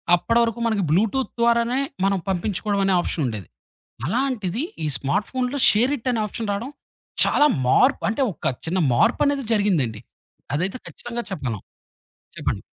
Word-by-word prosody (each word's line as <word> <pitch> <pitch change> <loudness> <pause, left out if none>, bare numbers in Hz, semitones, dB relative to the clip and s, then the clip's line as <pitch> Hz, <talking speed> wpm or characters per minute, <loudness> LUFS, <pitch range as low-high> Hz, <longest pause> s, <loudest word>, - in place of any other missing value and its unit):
అప్పటి 230 +6 +1
వరకు 235 0 0
మనకి 220 -4 +1
బ్లూటూత్ 220 - +1
ద్వారానే 235 +1 +3 0.3
మనం 195 0 +2
పంపించుకోడం 200 +2 -1
అనే 195 -1 +3
ఆప్షన్ 160 -3 -2
ఉండేది. 105 -7 -5 0.6
అలాంటిది 235 - -1 0.2
ఈ - - 0
స్మార్ట్ 180 +11 -1
ఫోనులో 255 +2 -1
షేర్ 240 +6 +3
ఇట్ 255 +1 -5
అనే 225 - 0
ఆప్షన్ 220 0 -5
రాడం 230 +7 -4 0.5
చాలా 295 - +4 0.2
మార్పు 255 - +4
అంటే 225 +5 0
ఒక 140 - -2
చిన్న 175 +3 0
మార్పు 225 - +3
అనేది 280 -2 0
జరిగిందండి. 165 - +1 0.5
అదైతే 180 +9 -1
ఖచ్చితంగా 240 0 -5
చెప్పగలం. 120 - -3 0.8
చెప్పండి. - - -2
215 Hz, 145 wpm, -23 LUFS, 180-240 Hz, 0.8 s, చాలా